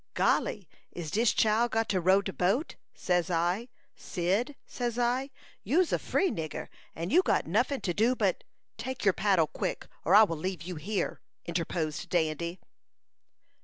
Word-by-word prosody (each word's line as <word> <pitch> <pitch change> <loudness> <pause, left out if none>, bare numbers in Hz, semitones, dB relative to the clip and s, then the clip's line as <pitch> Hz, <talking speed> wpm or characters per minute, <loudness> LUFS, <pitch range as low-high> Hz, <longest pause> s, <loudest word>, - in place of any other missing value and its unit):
"Golly! 200 -5 +1 0.2
Is 165 -4 -6
dis 225 +2 +3
chile 225 +2 +2
got 225 0 0
to 185 -3 +1
row 190 +3 +4
de 195 - -4
boat? 205 - 0 0.2
Says 180 -1 0
I, 175 +7 0 0.3
'Cyd,' 205 +10 -1
says 240 -2 -3
I, 250 +3 +1 0.3
'you's 325 - +2
a - - +2
free 380 - +1
nigger, 160 -2 -5 0.3
and 165 +2 -4
you 350 +6 +6
got - - +1
nuffin 245 - +1
to 175 - -1
do 230 +7 +2
but - - 0 0.2
'" - - -54
"Take 260 -3 -4
your 195 - +5
paddle 190 -5 +3
quick, 155 - -4 0.2
or 185 - +4
I 215 - +10
will 170 -6 -1
leave 180 0 -4
you 180 +2 -5
here!" 190 +4 -2 0.2
interposed 165 -2 -2
Dandy. 170 +1 -1
195 Hz, 165 wpm, -29 LUFS, 170-240 Hz, 0.3 s, I